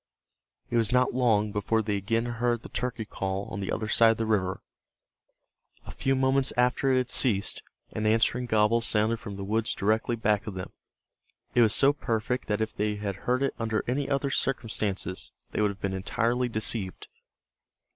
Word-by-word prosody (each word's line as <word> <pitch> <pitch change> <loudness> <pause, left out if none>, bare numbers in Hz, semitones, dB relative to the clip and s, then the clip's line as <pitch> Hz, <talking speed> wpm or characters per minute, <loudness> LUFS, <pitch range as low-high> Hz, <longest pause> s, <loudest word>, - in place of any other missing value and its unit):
It 120 - +2
was 115 0 +2
not 125 0 +3
long 110 -4 +2
before 110 +2 0
they 105 -1 -1
again 115 +4 0
heard 120 0 -1
the - - -9
turkey 125 -3 -3
call 95 -1 -3
on - - -5
the 95 - -3
other 110 - -2
side 115 +1 +5
of 115 - +2
the 115 - -1
river. 95 -4 0 1.2
A - - -8
few 135 0 0
moments 130 0 +2
after 125 +2 +2
it 130 - +3
had 125 -1 0
ceased, 105 -7 +1 0.3
an 110 0 -1
answering 115 +3 +2
gobble 110 +1 +3
sounded 110 0 +1
from 105 -3 -7
the 100 - -6
woods 110 +3 -1
directly 110 +4 +1
back 105 -2 0
of 105 - -5
them. 95 - -6 0.8
It 120 - +4
was 110 -3 +4
so 140 +1 +5
perfect 120 -1 -2
that 105 +1 0
if 110 0 -1
they 105 0 0
had 100 -2 -3
heard 125 +7 0
it 135 - 0
under 110 -1 -1
any 135 +3 -1
other 140 0 0
circumstances 105 -8 -2 0.2
they - - -1
would 105 - +3
have 100 0 -8
been 100 -1 -1
entirely 120 +6 0
deceived. 110 -4 -2
110 Hz, 185 wpm, -28 LUFS, 105-125 Hz, 1.2 s, side